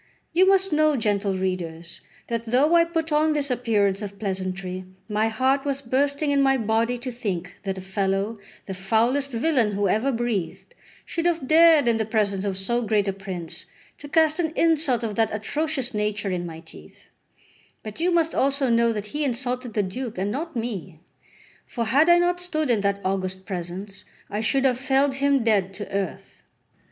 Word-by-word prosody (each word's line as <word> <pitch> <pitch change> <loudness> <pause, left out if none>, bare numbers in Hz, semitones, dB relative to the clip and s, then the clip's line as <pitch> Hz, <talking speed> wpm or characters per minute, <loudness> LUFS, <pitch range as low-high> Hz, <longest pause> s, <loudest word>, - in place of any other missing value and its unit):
You 370 +3 +5
must 390 -2 +3
know, 305 0 +3
gentle 205 -4 0
readers, 170 -3 -4 0.2
that 230 0 -4
though 270 +8 +3
I 335 0 +6
put 325 -1 -3
on 305 +1 +3
this 285 -2 0
appearance 210 -5 +1
of 200 -1 -7
pleasantry, 185 -2 -4 0.2
my 215 0 +1
heart 260 +4 +1
was 275 -1 -1
bursting 280 +4 0
in 280 -1 +3
my 270 0 +4
body 225 +1 0
to 250 +1 -5
think 195 -7 -4
that 195 -1 -2
a - - -6
fellow, 195 +3 -1 0.3
the 190 - -5
foulest 230 +9 +1
villain 240 -3 +1
who 200 0 +1
ever 220 +8 +1
breathed, 235 - -3 0.3
should 335 0 -1
have 330 -6 -1
dared 320 -3 +6
in 230 -1 +3
the 220 - -1
presence 205 -3 0
of 195 -2 -2
so 235 +5 0
great 215 -3 +1
a 195 - 0
prince 185 -4 -6 0.3
to 290 - -9
cast 315 +1 +3
an 320 -2 0
insult 305 -7 +2
of 220 -2 -2
that 225 -1 +2
atrocious 265 +4 -2
nature 210 -1 -1
in 175 -1 -2
my 165 -1 -9
teeth; 160 - -16 0.7
but 215 +3 -8
you 345 +2 +2
must 335 -2 +2
also 275 -2 +1
know 235 0 +3
that 210 -2 -4
he 300 +1 -1
insulted 250 -2 -2
the 210 - +2
Duke, 225 +4 -5
and 195 +2 -1
not 320 +5 -4
me; 200 -8 -5 0.7
for 235 -2 -3
had 285 +9 +4
I 345 - +7
not 350 0 +1
stood 310 -6 0
in 220 -4 +2
that 200 0 0
august 190 0 -2
presence, 190 +2 -5 0.3
I 210 +2 -2
should 270 +4 +1
have 250 -2 +2
felled 270 +1 +2
him 280 -2 +2
dead 195 -4 +1
to 205 - -4
earth. 195 -3 -4
230 Hz, 185 wpm, -24 LUFS, 195-280 Hz, 0.7 s, I